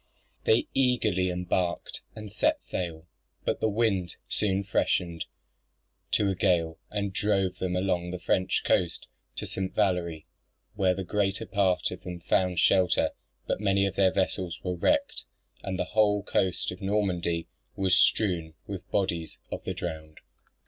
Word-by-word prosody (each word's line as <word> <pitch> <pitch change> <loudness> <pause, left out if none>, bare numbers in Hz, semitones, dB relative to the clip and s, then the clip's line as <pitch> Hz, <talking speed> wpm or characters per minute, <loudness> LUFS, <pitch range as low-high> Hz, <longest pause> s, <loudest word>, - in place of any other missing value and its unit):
They 445 -10 +4
eagerly 110 -8 +2
embarked, 90 0 -1
and 105 -2 -8
set 105 - +1
sail; 85 -2 -4 0.4
but - - 0
the 110 - +2
wind 100 -5 +1
soon 100 -2 +1
freshened 85 -3 0 0.9
to 105 - +3
a 95 - +2
gale, 85 -4 +1
and 100 -2 -2
drove 95 -3 +1
them 90 -1 -1
along 90 -2 0
the 90 - -3
French 95 +1 +1
coast 85 -3 +1 0.3
to - - -4
St. 95 0 -4
Valery, 85 -4 0 0.5
where 95 -3 +2
the 95 - -3
greater 95 +1 0
part 95 -3 +1
of 90 0 -7
them 90 -2 -6
found 90 +1 +1
shelter; 95 -2 +4 0.3
but - - -2
many 100 -1 +3
of 100 - -2
their 95 -1 +4
vessels 95 -2 -1
were 90 - -1
wrecked 90 - +1 0.4
and 95 -1 -3
the 90 - 0
whole 105 -2 +3
coast 95 -2 0
of 90 - -9
Normandy 90 -4 0 0.3
was 95 -1 +3
strewn 85 -7 +2
with 100 -4 -5
the - - -38
bodies 85 -5 -1
of - - -4
the - - -2
drowned. 80 -2 -6
95 Hz, 155 wpm, -28 LUFS, 90-100 Hz, 0.9 s, They